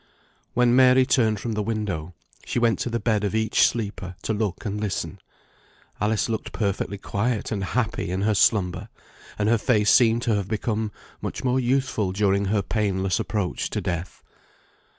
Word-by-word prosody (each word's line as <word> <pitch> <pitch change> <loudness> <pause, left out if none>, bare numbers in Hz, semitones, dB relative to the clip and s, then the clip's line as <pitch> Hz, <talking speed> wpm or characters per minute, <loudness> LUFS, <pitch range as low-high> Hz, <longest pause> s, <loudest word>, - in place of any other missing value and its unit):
When 125 0 +4
Mary 130 0 +6
turned 110 -5 +2
from 115 - -4
the 105 - -1
window, 100 -6 -3 0.3
she - - -4
went 120 -2 +2
to - - -2
the 120 0 -1
bed 105 -1 +1
of 105 +1 -1
each 110 -1 +4
sleeper, 100 -5 -4
to 110 - -1
look 105 -2 -2
and 105 0 -3
listen. 95 -3 -3 0.8
Alice 105 0 +1
looked 110 -2 -3
perfectly 100 -1 -2
quiet 105 +3 -2
and 100 -3 -2
happy 115 -2 -1
in 95 +2 -2
her 110 +1 +2
slumber, 95 -1 +2 0.5
and 105 - 0
her 115 0 +3
face 105 -3 +3
seemed 115 -1 +4
to 115 - +1
have 100 -2 -1
become 110 0 -2 0.3
much - - -5
more 130 0 +2
youthful 125 -6 0
during 100 0 +2
her 100 0 +1
painless 95 -2 0
approach 105 -4 -2
to 105 - -2
death. 90 -2 -4
105 Hz, 170 wpm, -24 LUFS, 100-115 Hz, 0.8 s, Mary